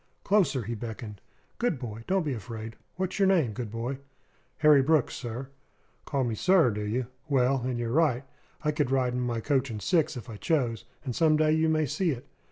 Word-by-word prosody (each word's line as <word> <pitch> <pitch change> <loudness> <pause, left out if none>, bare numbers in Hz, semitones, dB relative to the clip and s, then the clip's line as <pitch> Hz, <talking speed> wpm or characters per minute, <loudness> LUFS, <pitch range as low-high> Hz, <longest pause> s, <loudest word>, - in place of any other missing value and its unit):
"Closer!" 190 - +2
he 115 +3 -4
beckoned. 110 -2 -7 0.4
"Good 235 - +1
boy, 115 -3 -7
don't 190 -3 +1
be 145 - -1
afraid. 110 0 -7 0.2
What's 185 +2 -3
your 195 - +5
name, 170 - +3
good 120 -1 -5
boy?" 120 +5 -4 0.6
"Harry 150 -2 +6
Brooks, 150 0 +2
sir." 125 +2 -5 0.6
"Call 140 -2 0
me 120 -2 -1
'sir,' 165 - +4
do 105 0 -4
you? 115 +5 -1 0.2
Well, 135 -1 +3
and 125 0 -2
you're 120 -1 -2
right. 140 -3 +2 0.4
I 150 - +2
could 145 -3 0
ride 130 -2 +1
in 125 - -1
my 120 -2 -1
coach 135 0 +1
and 110 -2 -4
six 160 - +1
if 120 - -8
I 110 -3 -8
chose; 120 -6 0 0.2
and 125 -4 -3
some 155 -2 +4
day 155 0 +3
you 160 +1 +3
may 155 -1 +2
see 175 +6 0
it. 130 -3 -3
130 Hz, 205 wpm, -28 LUFS, 115-155 Hz, 0.6 s, Harry